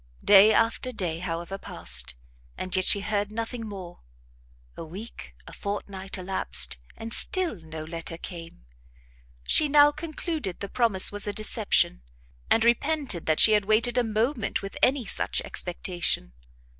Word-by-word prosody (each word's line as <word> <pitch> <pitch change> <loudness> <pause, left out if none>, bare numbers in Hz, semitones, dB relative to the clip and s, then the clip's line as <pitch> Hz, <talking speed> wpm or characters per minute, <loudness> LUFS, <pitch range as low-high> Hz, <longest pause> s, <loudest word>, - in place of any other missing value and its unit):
Day 205 +1 +7
after 230 +3 0
day, 175 -8 -3
however, 175 +2 -5
passed, - - 0 0.4
and 185 -1 -3
yet 185 0 +1
she 200 - +6
heard 205 0 -2
nothing 230 +1 -5
more; 185 -4 -10 0.8
a - - -8
week, 165 - -10
a - - -12
fortnight 195 -1 -6
elapsed, 185 - 0 0.2
and 225 0 -7
still 370 -5 +3
no 160 -1 -9
letter 165 +1 -3
came. 165 - -10 0.8
She 300 - +3
now 290 0 +5
concluded 310 - -5
the 200 - -5
promise 225 -6 +2
was 205 0 -4
a 205 - -2
deception, 215 - +1 0.5
and 225 - +3
repented 260 - 0
that 155 -1 +2
she 220 - +8
had 210 -2 +2
waited 225 +3 +2
a 250 - +2
moment 225 +1 -2
with 195 - -7
any 260 -2 +2
such - - -1
expectation. 175 - -2
205 Hz, 145 wpm, -25 LUFS, 175-230 Hz, 0.8 s, she